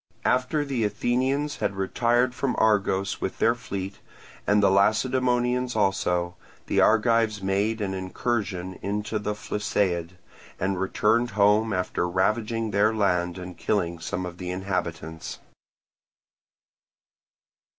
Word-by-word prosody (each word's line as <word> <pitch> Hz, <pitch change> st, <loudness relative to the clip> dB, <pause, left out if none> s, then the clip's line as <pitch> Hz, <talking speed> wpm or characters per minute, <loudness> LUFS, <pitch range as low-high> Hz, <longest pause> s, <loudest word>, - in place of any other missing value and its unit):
After 130 Hz, +4 st, +1 dB
the 130 Hz, -5 st, -1 dB
Athenians 130 Hz, +7 st, 0 dB
had 100 Hz, -, -1 dB
retired 120 Hz, +6 st, +1 dB
from 130 Hz, 0 st, -1 dB
Argos 100 Hz, -3 st, +1 dB
with 95 Hz, -, -3 dB
their 115 Hz, -, +3 dB
fleet, 100 Hz, -5 st, -6 dB, 0.5 s
and 105 Hz, 0 st, +4 dB
the 95 Hz, -, +5 dB
Lacedaemonians 125 Hz, +4 st, +2 dB
also, 90 Hz, -4 st, +1 dB, 0.3 s
the -, -, +2 dB
Argives 110 Hz, -2 st, +3 dB
made 100 Hz, +3 st, 0 dB
an 95 Hz, -2 st, -1 dB
incursion 95 Hz, -1 st, -3 dB
into 105 Hz, +2 st, -2 dB
the 105 Hz, 0 st, -2 dB
Phlisaid, 95 Hz, -5 st, -1 dB, 0.4 s
and 95 Hz, 0 st, -1 dB
returned 115 Hz, +5 st, +2 dB
home 105 Hz, +2 st, +4 dB
after 90 Hz, -2 st, -1 dB
ravaging 110 Hz, +4 st, 0 dB
their 100 Hz, +2 st, +3 dB
land 90 Hz, -4 st, +1 dB
and 90 Hz, -1 st, -7 dB
killing 85 Hz, -5 st, 0 dB
some 95 Hz, +2 st, -3 dB
of 90 Hz, 0 st, -8 dB
the 90 Hz, -1 st, -5 dB
inhabitants. 90 Hz, -4 st, -4 dB
105 Hz, 120 wpm, -26 LUFS, 95-115 Hz, 0.5 s, the